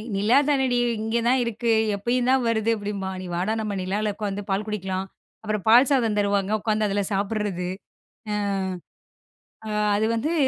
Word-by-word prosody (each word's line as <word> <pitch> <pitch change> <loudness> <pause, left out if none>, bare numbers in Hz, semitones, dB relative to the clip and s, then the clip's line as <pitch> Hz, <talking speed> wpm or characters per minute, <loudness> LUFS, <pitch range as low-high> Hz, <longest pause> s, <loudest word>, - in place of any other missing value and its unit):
"நிலா 215 +7 +3
தானடி 265 -3 +2 0.2
இங்க 225 +1 -1
தான் 260 0 +3
இருக்கு, 235 0 -1 0.2
எப்பயும் 245 +5 0
தான் 265 -2 +3
வருது." 225 0 +1
அப்டிம்பான். 200 -2 -4
"நீ 185 - -7
வாடா, 185 +5 0
நம்ம 210 -2 -3
நிலால 205 +3 -1
உட்காந்து 205 -1 -3
பால் 195 +2 0
குடிக்கலாம்." 190 -2 -3 0.4
அப்பறம் 210 -2 -3
பால் 245 +4 +7
சாதம் 230 -6 +2
தருவாங்க 200 -1 +1
உட்காந்து 215 -1 +1
அதுல 200 +1 0
சாப்பட்றது. 200 -2 -1 0.7
அ - - 0 1.3
அ - - -4 0.3
அது 215 +1 +1
வந்து, 300 +9 -1
210 Hz, 155 wpm, -24 LUFS, 200-230 Hz, 1.3 s, பால்